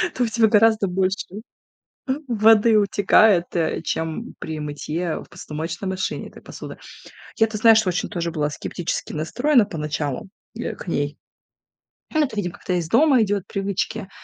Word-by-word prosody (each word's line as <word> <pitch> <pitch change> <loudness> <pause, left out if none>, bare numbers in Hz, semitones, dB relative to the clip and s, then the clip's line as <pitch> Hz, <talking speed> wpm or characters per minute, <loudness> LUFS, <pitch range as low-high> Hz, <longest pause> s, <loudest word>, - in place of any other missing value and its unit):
то 250 - +1
у - - +1
тебя 225 0 +3
гораздо 220 -1 +4
больше 190 +1 -1 1.0
воды 225 0 +5
утекает, 200 -2 +4
э, 165 -2 0
чем 160 -1 -3
при 160 -1 -5
мытье 150 +3 -3
в - - -20
посудомоечной 170 +3 -5
машине 190 0 -3
этой - - -15
посуды. - - -9 0.6
Я, 225 - +4
ты 215 -1 -5
знаешь, 220 -1 +6
очень 180 0 -1
тоже 170 -3 -3
была 150 -2 -1
скептически 170 +3 -4
настроена 225 - +2
поначалу, 150 -3 -4 0.3
э, 235 - -4
к - - -11
ней. 145 -3 -2 1.0
Ну, 310 - +3
это, 255 -6 -5
видимо, 180 -4 -2
как-то - - -5
из 170 -2 -1
дома 275 - +5
идёт, 205 -2 0
привычки, 195 0 -1
потому 190 - -10
190 Hz, 155 wpm, -22 LUFS, 165-220 Hz, 1.0 s, знаешь